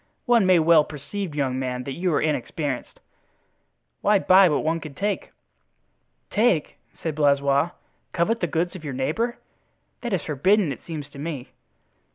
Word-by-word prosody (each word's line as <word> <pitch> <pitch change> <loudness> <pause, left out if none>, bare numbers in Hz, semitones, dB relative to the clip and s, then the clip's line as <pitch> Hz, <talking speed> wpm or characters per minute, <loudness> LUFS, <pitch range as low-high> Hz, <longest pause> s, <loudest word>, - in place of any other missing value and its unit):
"One 235 -6 +4
may 185 -1 +6
well 160 -1 +5
perceive, 155 +4 -6
young 130 -3 -1
man, 125 -1 -3
that 135 - -5
you 180 +4 -1
are 150 - +2
inexperienced. 145 -2 -2 1.0
Why 210 - +4
buy 190 -1 +6
what 150 - 0
one 165 +1 0
can 155 -4 -9
take?" 205 +3 -2 1.0
"Take!" 210 -8 +1 0.3
said 160 - -1
Blaisois; 140 +1 +2 0.4
"covet 215 +7 +1
the 175 - 0
goods 170 +3 -1
of 175 - -9
your 140 -4 -5
neighbor? 195 - -1 0.6
That 240 - -4
is 185 - 0
forbidden, 175 +4 +2
it - - -7
seems 155 -4 -5
to 140 - -12
me." 145 -4 -5
160 Hz, 160 wpm, -24 LUFS, 140-185 Hz, 1.0 s, may